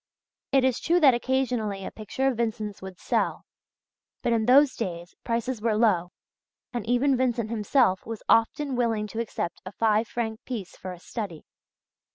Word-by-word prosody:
It 270 -1 +4
is 260 -2 +2
true 345 +2 +2
that 280 -6 +7
occasionally 240 -6 -1
a - - -5
picture 220 +5 -4
of 260 -4 0
Vincent's 220 -3 -2
would 190 -1 -8
sell; - - -1 0.8
but 235 - +2
in 225 -1 +1
those 275 +2 +6
days 175 -5 -5
prices 235 0 -2
were 220 -1 +1
low, 190 -6 +3 0.6
and 240 -3 -2
even 255 +3 +3
Vincent 240 -3 0
himself 215 -2 +2
was 225 -2 -6
often 260 +4 +2
willing 230 -3 +1
to 215 +2 -6
accept 210 -6 -3
a 185 - -7
five 220 +1 +2
franc 225 -2 -4
piece 220 -8 -6
for 185 - -7
a 180 - -9
study. 190 -5 -6
230 Hz, 170 wpm, -26 LUFS, 210-250 Hz, 0.8 s, that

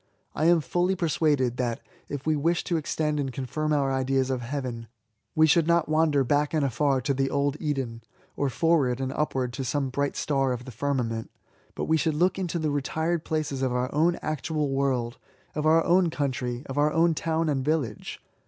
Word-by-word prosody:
I 155 - 0
am 170 -1 +5
fully 175 +7 0
persuaded, 150 -7 +1
that, 120 -2 -1 0.3
if 145 -1 -5
we 155 0 +2
wish 165 +4 +1
to 175 - -1
extend 150 -1 -1
and 135 -2 -2
confirm 145 +5 -3
our 140 -2 +2
ideas 130 0 +1
of 130 -2 -1
Heayen, 120 -2 -4 0.5
we 155 - +6
should 160 +1 +3
not 170 -1 +3
wander 155 -3 +3
back 145 +4 +1
and 150 -2 +2
afar 135 +1 +1
to 140 +3 0
the 135 0 0
old 140 0 0
Eden, 135 -7 -3 0.3
or 140 - 0
forward 135 -2 +2
and 130 0 -2
upward 130 -5 -1
to 135 - -4
some 135 +2 -1
bright 140 +1 -1
star 135 -3 0
of 125 0 -6
the 130 - -8
firmament, 120 -3 -2 0.5
but - - -2
we 160 - +3
should 155 0 0
look 180 +5 +2
into 175 -2 -2
the 155 -2 -1
retired 160 +4 -1
places 155 -4 -2
of 130 -2 +1
oiir 125 +1 -1
own 165 +4 +3
actual 155 -1 -1
world, 130 -3 -1 0.3
of 155 +1 -1
our 160 +1 +5
own 175 0 +3
country, 130 -4 -2
of 135 +2 -3
our 150 +1 +3
own 165 +1 +3
town 160 +1 -1
and 140 -3 0
yillage. 140 -8 -2
145 Hz, 200 wpm, -26 LUFS, 130-155 Hz, 0.5 s, we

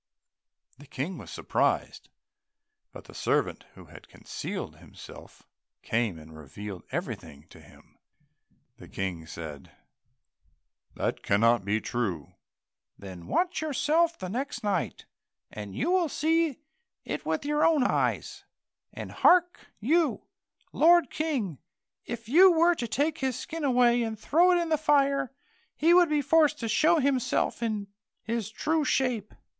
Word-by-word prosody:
The 145 - -14
King 160 +8 -5
was - - -11
surprised, - - -1 0.8
but - - -11
the - - -15
servant - - -1
who - - -13
had - - -15
concealed - - -6
himself - - -14 0.4
came 110 -6 -1
and 80 0 -13
revealed 90 +6 -8
everything 70 +1 -6
to - - -15
him. - - -20 0.8
The - - -13
King 90 -4 -5
said, 80 -4 -9 1.2
"That - - -2
cannot 115 +1 +3
be 100 +3 0
true." 100 -11 -3 0.6
"Then 90 -3 -10
watch 355 -2 0
yourself 315 +3 +1
the 185 - -6
next 255 +8 -4
night, 205 -1 -2 0.5
and 105 -2 -8
you 320 +9 0
will 360 -3 +2
see 320 -1 +1 0.5
it - - -4
with 300 - -2
your 295 +1 +1
own 315 -5 +4
eyes; - - -1 0.5
and - - -8
hark 355 0 +3
you, 315 +8 +1 0.5
lord 335 -3 +5
King, 255 - -2 0.5
if 230 -1 -7
you 360 +9 +7
were 340 +1 +4
to 245 -8 -4
take 295 +7 -1
his 260 -2 -1
skin 330 -1 -6
away 245 -3 +3
and 225 -1 -3
throw 340 +10 +4
it 355 - +4
in 340 -1 -2
the 310 -2 +1
fire, 275 -3 +2 0.4
he 330 +3 +4
would 350 -2 +6
be 300 -1 +1
forced 300 +1 +3
to 230 - -2
show 315 +10 +3
himself 265 -4 0
in 215 -3 -2 0.4
his 225 -2 -3
true 310 +7 0
shape." 250 -7 -1
260 Hz, 140 wpm, -27 LUFS, -, 1.2 s, you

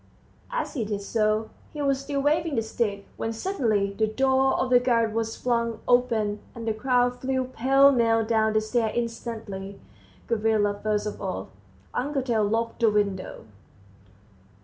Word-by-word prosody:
as - - -3
he 255 -8 -1
did 205 -1 -3
so. 215 +1 0 0.2
He 300 - -5
was 275 -1 +1
still 280 0 -2
waving 310 +1 +1
the 225 - +1
stick, 210 -3 -2
when 225 - -2
suddenly 225 - 0
the 220 +2 +1
door 265 +3 +2
of 255 - -1
the 245 - +7
garret 230 -3 +1
was 225 0 -2
flung 235 -2 -1
open; 225 -4 +2 0.2
all 230 - -7
the 225 -1 0
crowd 245 +2 +1
flew 260 0 0
pell 270 +2 +4
mell 230 -3 +2
down 220 -1 +2
the 215 - +3
stairs 220 0 0
instantly, 225 -4 -5 0.5
Gavrila 215 -2 +1
first 210 -1 0
of 210 - -5
all. 185 - -4 0.4
Uncle 275 +1 -1
Tail 230 -4 +1
locked 225 +3 -1
the 230 -2 +4
window. 200 -3 -1
230 Hz, 160 wpm, -26 LUFS, 215-255 Hz, 0.5 s, the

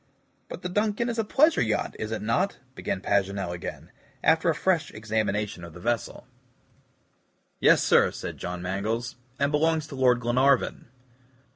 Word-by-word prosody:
"But - - -8
the 180 - -2
DUNCAN 210 +4 0
is 230 -1 -2
a - - +2
pleasure 300 +9 +3
yacht, 110 -2 -1
is 110 0 -4
it 110 - -3
not?" 115 - 0 0.2
began 95 - -3
Paganel 100 -2 0
again, 85 -1 -7 0.3
after 160 +2 +4
a 160 - +2
fresh 160 +1 +1
examination 105 -3 -2
of 85 -1 -9
the - - -9
vessel. 115 +3 -2 1.3
"Yes, - - +5
sir," - - +5
said - - -7
John 90 0 -5
Mangles, 110 +7 -2 0.2
"and 140 +1 +1
belongs 160 +1 +2
to 140 - -7
Lord 125 -2 +3
Glenarvan." 125 +2 +2
120 Hz, 155 wpm, -26 LUFS, 100-160 Hz, 1.3 s, Yes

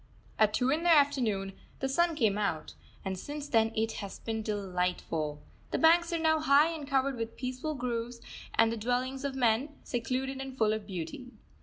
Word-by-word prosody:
At 215 -1 +4
two 255 +1 +2
in 310 +3 +1
the 345 - +2
afternoon 245 -11 +3 0.3
the 270 - 0
sun 335 +5 +2
came 220 -8 +2
out, 200 -7 -2 0.3
and 190 -1 -3
since 290 +4 -6
then 225 -4 +3
it 225 +1 +1
has 200 -1 -6
been 225 -1 -3
delightful. 180 -7 -2 0.3
The - - -1
banks 335 +1 +5
are 335 - +1
now 315 -1 +3
high 305 +2 +4
and 300 -3 -6
covered 270 -1 +1
with 230 0 -5
peaceful 255 +4 -3
groves 240 -1 -3 0.4
and 225 0 +4
the 230 - -3
dwellings 250 +4 -1
of 280 -1 -2
men, 255 +4 +1
secluded 260 +3 -2
and 265 -1 -7
full 215 -2 +3
of 215 -2 -4
beauty. 185 +7 -6
250 Hz, 185 wpm, -30 LUFS, 215-280 Hz, 0.4 s, banks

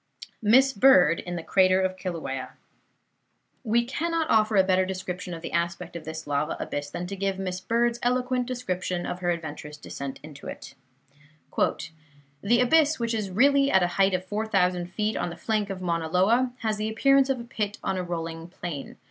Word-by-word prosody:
MISS 260 +5 +5
BIRD 185 - +5
IN 175 0 -5
THE 170 - -5
CRATER 185 +1 +4
OF 185 0 0
KILAUEA 135 -9 -5 1.1
We 235 0 +2
cannot 325 +5 -1
offer 215 0 +3
a 190 - +6
better 185 0 +3
description 185 -1 -5
of 165 - -10
the - - -5
aspect 170 +1 -2
of 170 - -7
this 160 0 -6
lava 145 +1 -1
abyss 145 0 -4
than 175 - -5
to 195 +2 -5
give 195 0 -1
Miss 185 -1 -3
Bird's 235 +2 +1
eloquent 250 0 0
description 185 -8 -3
of 180 - -4
her 175 -1 -1
adventurous 150 -3 -4
descent 140 -2 -7
into 150 -2 -10
it: - - -8 0.8
"The 150 - -2
abyss, 310 +3 +4
which 230 0 -1
really 230 +7 +3
is - - +1
at 190 - +5
a - - +3
height 195 -1 +4
of 185 0 -3
four 210 +3 -3
thousand 180 -4 +1
feet 210 +4 -2
on - - -1
the 170 - -8
flank 215 -1 -1
of 185 -1 -5
Mauna 165 -2 -1
Loa, 230 +9 +3
has 220 -2 -1
the 215 +1 -2
appearance 275 +4 +4
of 265 -2 0
a - - -6
pit 210 -3 -3
on - - -1
a 185 - -2
rolling 165 -1 -5
plain. 170 -5 -7
185 Hz, 190 wpm, -26 LUFS, 170-230 Hz, 1.1 s, a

